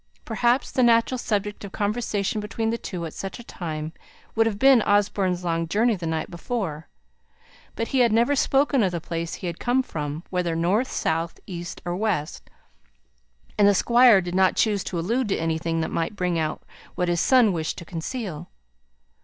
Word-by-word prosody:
Perhaps 240 +3 +1
the 260 - +1
natural 235 +1 +3
subject 210 -2 -2
of 200 - -7
conversation 210 0 -1
between 225 +1 -2
the 230 - -1
two, 175 -3 -5
at 160 - -7
such 195 -1 -6
a 240 - -10
time, 155 -6 -5 0.4
would 225 0 +3
have 210 -3 -2
been 265 0 +6
Osborne's 200 -3 +1
long 165 -1 -1
journey 220 +6 +2
the 170 -3 -5
night 160 -1 -2
before; 170 -5 -4 0.9
but 230 - -3
he 265 - +1
had 240 -2 +4
never 235 +6 +3
spoken 275 0 +2
of 190 -4 +2
the 170 - -3
place 165 0 -4
he - - -8
had 170 -1 -4
come 255 +2 +1
from, 150 - -5
whether 180 -3 -1
north, 190 +10 +1
south, 165 +1 -1
east, 175 -2 -7
or 175 0 -2
west, 185 -6 -2 1.1
and 205 - +6
the 205 - +5
Squire 235 -1 +6
did 175 -1 -5
not 190 0 +3
choose 205 -4 +1
to 180 - -4
allude 225 +9 0
to 195 - +1
anything 165 0 -1
that 160 - -3
might 165 +5 -2
bring 180 -3 0
out 155 -1 -2 0.3
what 180 - 0
his 175 -1 +1
son 250 -7 +5
wished 160 -2 -3
to 170 - -8
conceal. 175 - -5
195 Hz, 185 wpm, -24 LUFS, 170-230 Hz, 1.1 s, been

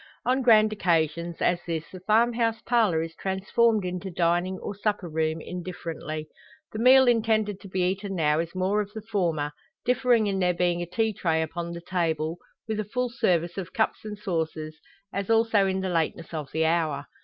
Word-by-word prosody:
On 255 +2 +2
grand 215 -3 +5
occasions, 170 -3 0
as 175 0 +2
this, 165 -2 -2
the 185 - -9
farm 220 +5 +3
house 230 -1 0
parlour 215 -9 +2
is 165 0 -7
transformed 195 +2 +1
into 180 +1 -4
dining 175 +2 +1
or 200 - -5
supper 205 -2 -2
room, 160 0 -1
indifferently. 165 -3 -6 0.4
The 215 - -5
meal 260 +2 +7
intended 220 -4 +2
to 200 - -11
be 185 0 -2
eaten 195 +2 -1
now 150 -2 +2
is 170 +2 -3
more 190 +3 +1
of 205 0 -6
the 220 - -6
former, 170 -9 -1 0.3
differing 250 -2 +3
in 195 -2 0
there 180 -1 +2
being 175 0 +1
a 175 - -4
tea 220 +4 0
tray 165 -4 0
upon 170 +2 -5
the 170 - -7
table, 165 -2 -1 0.3
with 220 -1 -2
a - - 0
full 245 +4 -2
service 175 -6 0
of 180 - -7
cups 220 - 0
and 210 -1 -6
saucers, 160 -5 -3 0.4
as 200 +1 -3
also 225 -3 +4
in 190 0 -1
the 190 - -2
lateness 165 0 -1
of 150 -4 -5
the 160 0 +1
hour. 160 -4 0
185 Hz, 190 wpm, -26 LUFS, 165-215 Hz, 0.4 s, meal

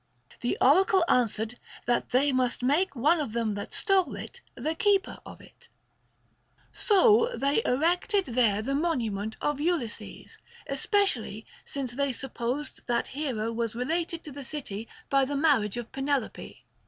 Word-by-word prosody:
The 245 - -1
oracle 375 - +5
answered 225 -3 +1 0.3
that 240 0 +1
they 275 +3 +3
must 255 -1 0
make 295 +7 +2
one 300 +8 +3
of 275 -8 -3
them 230 -2 0
that 205 0 -6
stole 390 -3 +2
it - - -8
the 305 +6 -2
keeper 395 +3 +1
of - - -11
it. - - -18 1.1
So 450 +2 +4
they 280 +9 +1
erected 355 - +2
there 230 -4 +2
the 270 +4 -2
monument 225 - -1
of 295 -1 -1
Ulysses, 310 -9 -3 0.3
especially 275 - 0 0.2
since 270 -3 -4
they 275 +1 -1
supposed 260 +3 -4
that 240 -1 0
hero 250 -6 -2
was 230 -1 -2
related 330 +6 -2
to 300 - -8
the 280 +1 -8
city 235 -6 -5 0.2
by 275 -1 +4
the 280 +2 -2
marriage 270 -9 +2
of 240 -1 -6
Penelope. 270 -2 -3
275 Hz, 145 wpm, -28 LUFS, 235-325 Hz, 1.1 s, oracle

